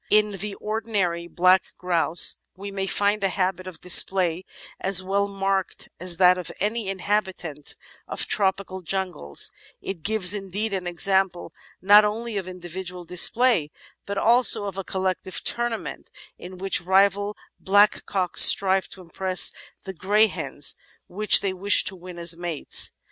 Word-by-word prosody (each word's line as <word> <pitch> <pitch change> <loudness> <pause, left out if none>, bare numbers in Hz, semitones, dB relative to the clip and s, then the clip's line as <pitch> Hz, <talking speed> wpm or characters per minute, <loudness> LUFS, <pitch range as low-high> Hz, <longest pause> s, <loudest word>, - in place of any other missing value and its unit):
In 210 -1 +2
the 205 0 -4
ordinary 210 -6 -3
Black 185 +2 +3
Grouse 175 -2 +2 0.2
we 200 +1 -8
may 195 -1 -4
find 205 +2 0
a 195 - +1
habit 185 -1 -3
of 185 -3 -9
display 180 -1 +2 0.3
as 190 -1 +3
well 200 +2 -1
marked 195 -1 -3
as 180 -1 -2
that 180 0 +4
of 180 - -7
any 210 +2 -2
inhabitant 190 -6 -3 0.3
of - - -2
tropical 190 -1 -1
jungles; 180 - -3 0.3
it 190 -4 -7
gives, 205 -1 +3
indeed, 200 +1 -4
an 185 -2 -4
example 190 +1 -1 0.3
not 205 +2 +7
only 220 +2 -3
of 190 -2 -4
individual 180 0 -7
display 180 0 +2 0.4
but 200 0 -5
also 235 -1 +4
of 195 -2 -6
a 195 - -5
collective 185 0 -4
"tournament" 240 -1 -3 0.3
in 185 +1 -11
which 190 0 +1
rival 200 +3 +1 0.3
blackcocks 195 -2 +2
strive 190 -2 +5
to 190 - -13
impress 185 +2 0 0.3
the 190 - -8
greyhens 205 +5 0 0.3
which 210 +3 +4
they 195 -2 -2
wish 200 +2 +4
to 195 - -5
win 180 -1 -12
as 170 0 -1
mates. 170 -3 +1
190 Hz, 145 wpm, -23 LUFS, 180-200 Hz, 0.4 s, not